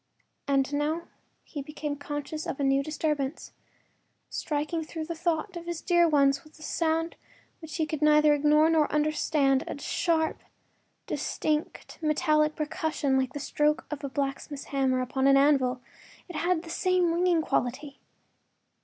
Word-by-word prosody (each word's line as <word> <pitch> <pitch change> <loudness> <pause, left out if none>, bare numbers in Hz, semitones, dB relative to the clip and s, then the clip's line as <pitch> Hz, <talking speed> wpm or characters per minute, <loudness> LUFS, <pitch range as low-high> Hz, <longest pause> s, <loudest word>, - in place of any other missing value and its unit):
And 275 0 +1
now 305 +4 -1 0.3
he 290 - -6
became 295 +1 -5
conscious 290 +2 -5
of - - -4
a - - 0
new 270 0 +3
disturbance. 300 -1 -2 0.8
Striking 305 +2 -2
through 315 0 -6
the 335 - -4
thought 335 +2 -2
of 340 0 -7
his 345 -1 -3
dear 345 -1 +3
ones 275 -2 +3
was 305 - -19
sound 325 +1 -1 0.4
which 320 -4 -8
he 315 - +1
could 310 -1 -4
neither 300 0 +5
ignore 300 +2 +4
nor 320 -2 +2
understand, 300 -2 +2
a - - -5
sharp, 320 +1 0 0.6
distinct, 305 0 -3
metallic 305 0 +2
percussion 305 -3 -1
like 260 -1 0
the 290 - -4
stroke 300 +2 0
of 300 -1 -5
a 280 - -3
blacksmith’s 275 +1 -4
hammer 260 -2 +2
upon 265 +1 -1
the 275 0 +6
anvil; 270 -3 +3 0.5
it 355 - -9
had 335 +2 0
the 330 - -8
same 365 -2 +2
ringing 345 -1 +2
quality. 270 +1 -2
300 Hz, 150 wpm, -28 LUFS, 280-320 Hz, 0.8 s, the